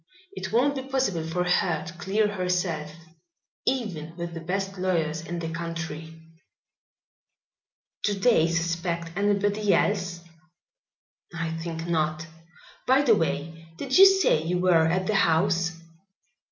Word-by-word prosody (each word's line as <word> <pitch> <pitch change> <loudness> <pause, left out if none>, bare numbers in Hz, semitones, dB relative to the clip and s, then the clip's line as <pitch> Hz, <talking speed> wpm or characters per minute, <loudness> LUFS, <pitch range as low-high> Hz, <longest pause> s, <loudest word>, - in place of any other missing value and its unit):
It - - -6
won't 255 +6 +3
be 270 - -4
possible 260 -11 -1
for 165 +2 -1
her 175 -3 +1
to 165 - -8
clear 195 +4 0
herself, 180 -6 -2 0.8
even 185 -12 -2
with 170 -1 -5
the 165 - -5
best 195 +3 -3
lawyers 165 -4 0
in 170 +1 -6
the 165 -1 -4
country." 165 -1 -6 1.9
"Do 205 - +1
they 195 -5 +3
suspect 170 0 -2
anybody 205 +1 +2
else?" 180 -4 0 1.1
"I 170 -1 -3
think 165 0 -5
not. 155 -1 -1 0.6
By 265 +2 +5
the 240 -5 +5
way, 165 -2 -2
did 265 +3 -2
you 390 +1 +10
say 385 - +3
you 175 +3 -1
were 175 -3 +4
at 185 +3 0
the 215 - 0
house?" 170 -1 +2
175 Hz, 130 wpm, -26 LUFS, 165-200 Hz, 1.9 s, you